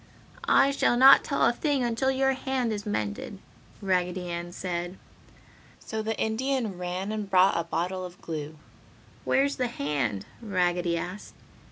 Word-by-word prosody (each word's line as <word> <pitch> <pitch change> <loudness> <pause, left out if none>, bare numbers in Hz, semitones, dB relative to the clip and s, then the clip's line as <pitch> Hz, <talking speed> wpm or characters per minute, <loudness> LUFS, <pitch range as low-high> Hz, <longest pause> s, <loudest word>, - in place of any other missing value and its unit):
"I 275 - +5
shall 260 -3 +2
not 265 +2 +8
tell 280 - +1
a - - +3
thing 285 0 0
until 240 +3 0
your 270 0 +2
hand 260 -3 -1
is 205 0 -5
mended!" 110 - -3 0.5
Raggedy 180 -1 -1
Ann 170 0 -5
said. 175 0 -4 0.8
So 220 -1 -4
the 220 0 -3
Indian 220 -3 -1
ran 180 +3 -3
and 210 -2 -4
brought 190 0 +5
a 170 - -1
bottle 180 +3 -2
of 180 0 -9
glue. 155 -1 -6 0.7
"Where's 280 +1 +2
the 250 - 0
hand?" 140 - -2 0.2
Raggedy 175 -5 0
asked. 180 +4 -7
190 Hz, 150 wpm, -27 LUFS, 175-240 Hz, 0.8 s, not